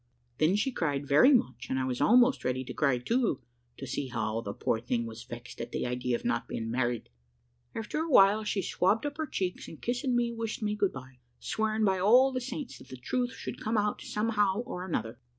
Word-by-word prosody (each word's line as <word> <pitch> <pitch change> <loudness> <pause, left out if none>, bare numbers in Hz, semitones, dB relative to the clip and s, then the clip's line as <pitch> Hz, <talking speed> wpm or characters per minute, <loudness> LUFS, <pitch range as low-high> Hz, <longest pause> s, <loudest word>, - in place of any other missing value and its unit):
Then 160 +5 +4
she 220 +6 +1
cried 145 - -1
very 150 - +6
much, 130 - +1
and 130 - 0
I 130 - 0
was 125 -1 -2
almost 250 +3 +5
ready 130 +1 -1
to - - -7
cry 140 -4 +2
too, 225 - 0 0.4
to 135 - -6
see 135 +1 -3
how 115 -2 -2
the 100 - -5
poor 110 - -1
thing 115 0 -1
was 115 0 -8
vexed 120 +1 -9
at 120 +1 -6
the - - -2
idea 125 0 -1
of - - -6
not 245 - 0
being 115 0 -4
married. 120 -1 -1 0.7
After 225 +7 -3
a 325 +1 -2
while 210 -4 +6
she 205 -2 -1
swabbed 200 +9 +1
up 290 0 -4
her 315 -1 -2
cheeks, 185 -8 -3
and 160 - -10
kissing 245 +1 -1
me, 240 -1 +1
wished 225 -1 -4
me 210 0 0
good 200 -2 +1
bye, 130 -1 -10 0.2
swearing 220 0 0
by 190 -2 +2
all 245 +8 +6
the 255 -1 -2
saints 260 +1 -6
that - - -14
the 130 - -9
truth 245 - -2
should - - -7
come 220 +1 0
out 210 0 0
somehow 210 -1 0
or 210 -7 -6
another. 115 -10 -3
190 Hz, 220 wpm, -29 LUFS, -, 0.7 s, very